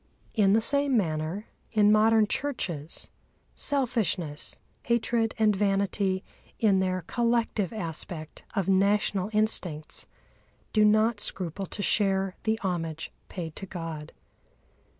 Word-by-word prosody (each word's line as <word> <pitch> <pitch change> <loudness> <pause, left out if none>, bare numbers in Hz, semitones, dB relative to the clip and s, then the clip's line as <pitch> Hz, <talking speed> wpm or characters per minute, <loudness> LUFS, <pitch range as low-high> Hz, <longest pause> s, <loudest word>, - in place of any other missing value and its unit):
In 200 -3 +4
the 225 - +4
same 280 +1 +4
manner, 165 +2 -1 0.3
in 210 -1 +5
modern 220 +1 +5
churches, 185 - -3 0.4
selfishness, 220 - -1 0.2
hatred 235 -1 +1
and 215 -2 +3
vanity 195 -1 +1 0.3
in 200 -4 +3
their 185 -1 0
collective 230 -4 0
aspect 165 -5 -5
of 195 -3 0
national 200 0 +2
instincts 185 -8 -1 0.7
do 215 - +5
not 215 +1 +4
scruple 190 -1 -2
to 205 - -4
share 195 -2 +1
the 220 0 +2
homage 165 -4 -3 0.2
paid 165 -4 -6
to 195 - -6
God. 165 -4 -6
200 Hz, 110 wpm, -28 LUFS, 175-220 Hz, 0.7 s, in